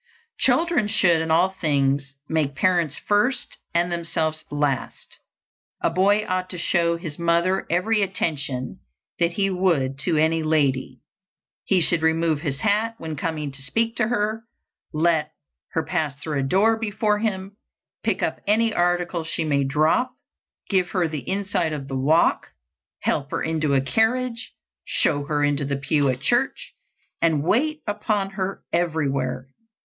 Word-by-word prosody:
Children 330 -10 +2
should 175 -6 +3
in 160 - -3
all 170 +4 +4
things 140 -6 0
make 150 -4 0
parents 170 -2 +1
first 240 +5 0
and 175 +1 +1
themselves 160 -2 -2
last. 145 -3 -3 0.6
A - - +1
boy 200 +4 +3
ought 185 0 -1
to 180 - -5
show 170 -1 +1
his 165 -3 -7
mother 170 +3 +1
every 210 +6 +2
attention 145 -9 -2 0.4
that 170 0 +2
he 195 +1 +1
would 160 -8 +1
to 160 +3 +1
any 160 +1 +2
lady. 140 -5 0 0.6
He 190 -2 +3
should 170 0 +4
remove 160 -1 +1
his 140 -4 -3
hat 220 +2 +1
when 160 -5 -5
coming 150 -1 -3
to 135 0 -8
speak 225 +12 0
to 220 - +2
her, 220 -1 -1 0.5
let 155 -1 +1 0.4
her 160 - 0
pass 155 -3 -2
through 145 +1 -3
a - - 0
door 200 +10 +3
before 210 -1 0
him, 200 -2 -3 0.5
pick - - -1
up - - -1
any 225 +2 +3
article 175 -1 0
she 160 0 -2
may 140 -3 +1
drop, 155 - +1 0.5
give 185 -3 +1
her 180 -4 +2
the 155 -3 -6
inside 190 -4 0
of 140 -3 -5
the 135 - -4
walk, 150 +5 +2 0.6
help 140 0 0
her - - -2
into 155 -3 0
a 135 - +3
carriage, 230 - 0 0.3
show 145 -2 0
her 145 0 0
into 145 0 +1
the 140 0 -2
pew 140 0 +1
at 130 0 -2
church, 240 - 0 0.5
and 160 -4 +2
wait 300 - +1
upon 205 -1 -1
her 195 -1 -4
everywhere. 140 -7 -1
170 Hz, 155 wpm, -23 LUFS, 145-195 Hz, 0.6 s, all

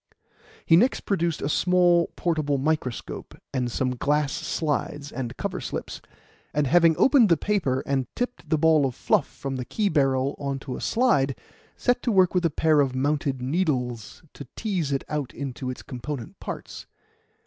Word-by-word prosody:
He 165 - +6
next 240 +10 +3
produced 170 -5 -1
a - - 0
small, 175 +1 +3
portable 155 -5 0
microscope 135 -3 -3 0.2
and 125 -2 -1
some 130 +2 0
glass 145 +2 +1
slides 145 -2 -2
and 125 -1 -5
cover - - -3
slips, - - -5 0.5
and 150 -1 +2
having 165 +3 +5
opened 265 -6 +5
the 170 - +5
paper 160 -10 0
and 135 -2 0
tipped 245 0 -4
the 155 - +3
ball 155 -2 +4
of 125 - -6
fluff - - +1
from 135 -1 -5
the 125 - -3
key 205 - -1
barrel 135 -3 +1
on 140 -1 -2
to 130 -2 -5
a - - -7
slide, 145 - +2 0.4
set 245 0 +1
to 240 - 0
work 185 -3 +4
with 180 -2 +1
a - - -2
pair 155 0 +3
of 135 -2 0
mounted 140 -1 0
needles 125 - -2
to 140 - -10
tease 185 -10 -2
it 135 - 0
out 150 -4 -4
into 130 -2 -5
its 130 - -6
component 125 -1 -7
parts. - - -7
145 Hz, 170 wpm, -25 LUFS, 135-170 Hz, 0.5 s, He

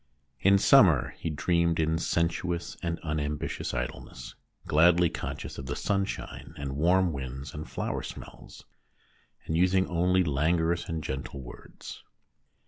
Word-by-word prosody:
In 100 +1 +5
summer 90 - +5
he - - -3
dreamed 85 +2 +1
in 80 +1 +1
sensuous 85 +1 -1
and 85 -1 -2
unambitious 75 -2 -3
idleness, - - -6 0.3
gladly 85 +2 +4
conscious - - -6
of 65 - -7
the 70 - -3
sunshine 100 +2 -3
and 70 -2 -4
warm 90 +3 +3
winds 65 0 -6
and 75 +1 -7
flower - - -3
smells, - - -10 0.8
and 80 - -2
using 95 +2 +3
only 90 +2 +2
languorous 80 +3 +1
and 80 -2 -3
gentle 65 +1 -5
words. - - -11
80 Hz, 130 wpm, -28 LUFS, 75-90 Hz, 0.8 s, In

